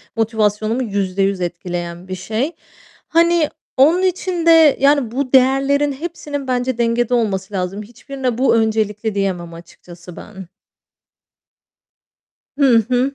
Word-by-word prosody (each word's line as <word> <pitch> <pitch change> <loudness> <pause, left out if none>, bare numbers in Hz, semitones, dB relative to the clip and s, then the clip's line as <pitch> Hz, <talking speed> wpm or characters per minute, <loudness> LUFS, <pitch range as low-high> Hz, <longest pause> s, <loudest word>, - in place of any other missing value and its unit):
motivasyonumu 220 +1 0
%100 195 -2 -1
etkileyen 175 0 -5
bir 185 - -5
şey. 220 - -3 0.6
Hani, 335 -1 +2 0.3
onun 320 +7 +4
için 365 -2 -1
de, 325 -3 +6
yani, 275 -4 +2
bu 265 +1 -3
değerlerin 275 +2 +3
hepsinin 290 -2 -6
bence 250 -1 -1
dengede 235 +1 0
olması 200 -4 -1
lazım. 190 +2 -3
Hiçbirine 250 +2 -5
bu 260 -2 +3
öncelikli 220 -1 -1
diyemem 180 -4 -2
açıkçası 175 +1 -13
ben. 190 -4 -11 2.1
Hı 260 -5 +5
hı. 255 +2 0
230 Hz, 115 wpm, -18 LUFS, 195-275 Hz, 2.1 s, de